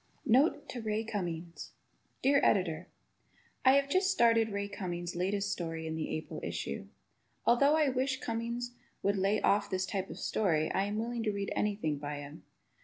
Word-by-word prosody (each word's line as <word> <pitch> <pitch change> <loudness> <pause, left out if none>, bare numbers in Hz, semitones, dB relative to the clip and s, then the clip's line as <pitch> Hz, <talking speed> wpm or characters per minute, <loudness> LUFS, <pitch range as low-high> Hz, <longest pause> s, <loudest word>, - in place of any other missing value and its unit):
Note 280 +4 +3
to 245 - -5
Ray 215 0 -1
Cummings 175 -6 -5 0.5
Dear 280 +1 +5
Editor: 180 -3 +2 0.8
I 260 - +7
have 280 0 +4
just 370 +6 +2
started 230 - +4
Ray 200 0 -2
Cummings' 175 -4 -4
latest 195 +2 0
story 165 -4 -3
in 160 0 -3
the 160 - -3
April 155 - -4
issue. - - -4 0.6
Although 280 +5 +5
I 305 -3 +3
wish 265 +1 0
Cummings 235 +1 -3 0.3
would 200 +1 +2
lay 195 +2 +2
off 205 +1 +3
this 185 0 0
type 195 -1 -3
of - - -7
story, 160 -7 +1
I 195 - +1
am 205 +1 -2
willing 235 +1 -2
to 220 -1 0
read 200 -1 -3
anything 200 -9 0
by 145 0 -4
him. 145 +1 -8
205 Hz, 175 wpm, -32 LUFS, 175-240 Hz, 0.8 s, I